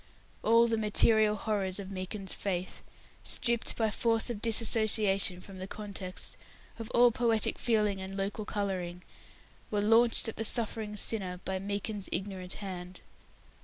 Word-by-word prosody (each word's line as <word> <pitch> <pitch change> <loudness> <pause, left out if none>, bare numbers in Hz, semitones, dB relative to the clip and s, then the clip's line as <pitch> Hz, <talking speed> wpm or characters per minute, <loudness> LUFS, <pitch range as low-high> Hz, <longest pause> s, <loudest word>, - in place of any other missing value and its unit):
All 230 +1 +5
the 225 -1 0
material 215 0 +4
horrors 200 -3 -2
of 200 -1 -6
Meekin's 190 +1 -4
faith 185 -2 -3 0.4
stripped, 235 -1 -1
by 220 -2 +1
force 230 +2 +1
of 210 -3 -6
dissociation 215 -4 +3
from 190 0 -11
the 185 - -5
context, 200 -3 -7 0.4
of 225 0 -6
all 240 0 +5
poetic 230 -2 +1
feeling 210 -4 +1
and 190 +1 -6
local 200 +3 -2
colouring 185 -4 -3 0.7
were 210 - 0
launched 225 +3 +4
at 225 - -5
the 225 - -2
suffering 220 -1 -2
sinner 190 -4 -2
by 190 0 -2
Meekin's 200 +1 -3
ignorant 190 -2 -3
hand. 180 -2 -7
205 Hz, 140 wpm, -31 LUFS, 190-225 Hz, 0.7 s, All